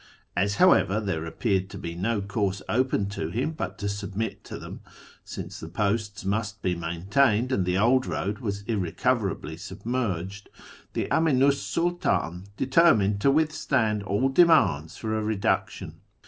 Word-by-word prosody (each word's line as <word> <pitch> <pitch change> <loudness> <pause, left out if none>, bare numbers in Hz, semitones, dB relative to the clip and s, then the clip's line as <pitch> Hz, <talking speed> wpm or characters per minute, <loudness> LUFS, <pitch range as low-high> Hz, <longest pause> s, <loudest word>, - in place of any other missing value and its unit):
As, 100 +4 +1
however, 140 - +4
there 95 -7 -2
appeared 95 +2 -1
to - - -8
be 85 - -5
no 100 +5 -1
course 100 -1 -2
open 125 -4 +1
to 90 -5 -4
him 125 - -1
but 160 - -5
to 100 - -3
submit 100 +2 -4
to - - -7
them - - -9 0.4
(since - - -7
the 80 - -7
posts 105 +2 -2
must 105 +1 -2
be 90 - +1
maintained, 100 +9 +1
and 95 -8 0
the 90 +1 +1
old 125 +5 +3
road 105 +3 -2
was 100 -4 -4
irrecoverably 100 -3 -1
submerged), 100 -2 -4 0.4
the - - -1
Aminu 140 -4 +4
's 140 - -4
Sidtdn 95 - -1
determined 115 -9 +3
to 140 - +4
withstand 135 -7 +1
all 100 +7 0
demands 135 - +4
for 110 -1 -2
a 110 - 0
reduction. 105 -2 -2
105 Hz, 150 wpm, -26 LUFS, 95-130 Hz, 0.4 s, however